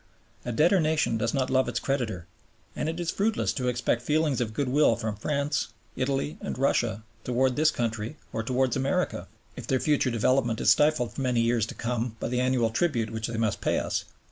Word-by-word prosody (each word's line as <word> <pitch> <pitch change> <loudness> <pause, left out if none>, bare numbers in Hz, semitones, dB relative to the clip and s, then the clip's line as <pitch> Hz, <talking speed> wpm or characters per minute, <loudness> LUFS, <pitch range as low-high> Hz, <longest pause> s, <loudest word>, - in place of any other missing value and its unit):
A 120 - -3
debtor 170 - +4
nation 155 -8 +1
does 115 +1 0
not 130 -2 -1
love 130 0 +3
its - - -1
creditor, 115 -11 -2 0.5
and 155 - -1
it 165 +2 -4
is 170 -1 -1
fruitless 215 +2 0
to 125 -2 -2
expect 120 -1 0
feelings 150 0 +1
of 110 -3 -3
goodwill 140 -2 +3
from 110 -2 -3
France, 140 -1 -2 0.2
Italy, 135 +3 -1
and - - -4
Russia 120 -5 +1 0.2
towards 125 +1 +1
this 155 +4 +3
country 115 +1 -3 0.2
or 115 - -1
towards 130 +2 0
America, 135 +1 -1 0.3
if - - -8
their 130 - +2
future 145 -2 +2
development 120 0 +1
is - - +5
stifled 150 -7 +3
for - - -5
many 125 -3 +1
years 115 -2 +1
to - - -8
come 120 -1 -2
by - - -2
the 125 0 0
annual 125 -3 +2
tribute 115 -5 0
which 110 0 -3
they 115 -1 -4
must 110 -2 0
pay - - +1
us. - - -2
125 Hz, 200 wpm, -27 LUFS, 115-140 Hz, 0.5 s, is